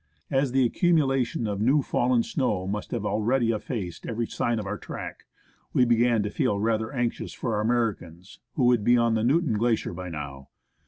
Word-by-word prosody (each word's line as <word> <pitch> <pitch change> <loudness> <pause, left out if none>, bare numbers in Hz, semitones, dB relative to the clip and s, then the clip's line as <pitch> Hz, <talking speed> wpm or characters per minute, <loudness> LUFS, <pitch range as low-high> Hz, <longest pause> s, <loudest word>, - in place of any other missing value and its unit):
As 135 -1 +1
the 130 0 +3
accumulation 135 -6 +1
of 100 -1 -2
new 135 +5 +3
fallen 120 -2 +1
snow 105 -10 -1
must 105 +2 -4
have 105 - -3
already 115 +3 +1
effaced 105 -5 -4
every 115 0 -2
sign 120 +1 -1
of 105 - -3
our 105 +1 -4
track, - - -8 0.5
we 125 - +4
began 120 -2 +3
to 105 - -3
feel 100 -1 0
rather 110 +1 0
anxious 120 -4 -2
for 115 - -3
our 105 - 0
Americans, 105 -7 -2 0.2
who 135 - +1
would 120 -3 +3
be 120 +3 +5
on 115 -1 +2
the 110 -1 +1
Newton 145 +1 +2
Glacier 115 -4 0
by 90 +1 -6
now. 70 -4 -7
115 Hz, 190 wpm, -26 LUFS, 105-125 Hz, 0.5 s, be